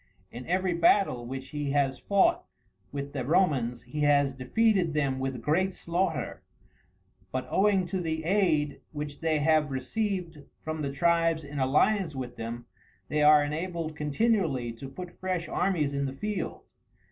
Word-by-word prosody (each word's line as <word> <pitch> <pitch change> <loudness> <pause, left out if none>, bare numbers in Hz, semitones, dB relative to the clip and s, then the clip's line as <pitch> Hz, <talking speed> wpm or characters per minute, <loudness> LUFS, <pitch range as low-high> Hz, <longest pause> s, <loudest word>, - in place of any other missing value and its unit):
In 125 +1 -8
every 185 +1 +1
battle 170 -8 +3
which 130 +1 -6
he 150 -2 -3
has 135 -2 +1
fought 200 -1 +2 0.5
with 140 0 -5
the 135 -3 -2
Romans 130 -6 +1
he 135 +5 -6
has 145 -2 +3
defeated 175 - +1
them 140 -3 0
with 130 -3 -3
great 185 +5 +1
slaughter; 175 +3 -2 0.9
but, - - -2
owing 195 -2 +3
to 185 +1 -3
the 160 -1 -2
aid 160 -6 +1
which 150 -1 -5
they 160 -1 +2
have 155 0 +3
received 170 - -3 0.2
from 155 0 -3
the 140 -2 -2
tribes 165 +1 +2
in 145 0 -6
alliance 155 +6 +2
with 125 -2 -5
them, 115 +1 -6 0.4
they 150 - +1
are 150 0 +7
enabled 160 +1 -3
continually 150 - 0
to 125 +4 -9
put 175 +5 -9
fresh 185 -2 -2
armies 160 -7 0
in 140 0 -1
the 135 - -3
field. 210 +8 -4
150 Hz, 155 wpm, -28 LUFS, 140-180 Hz, 0.9 s, are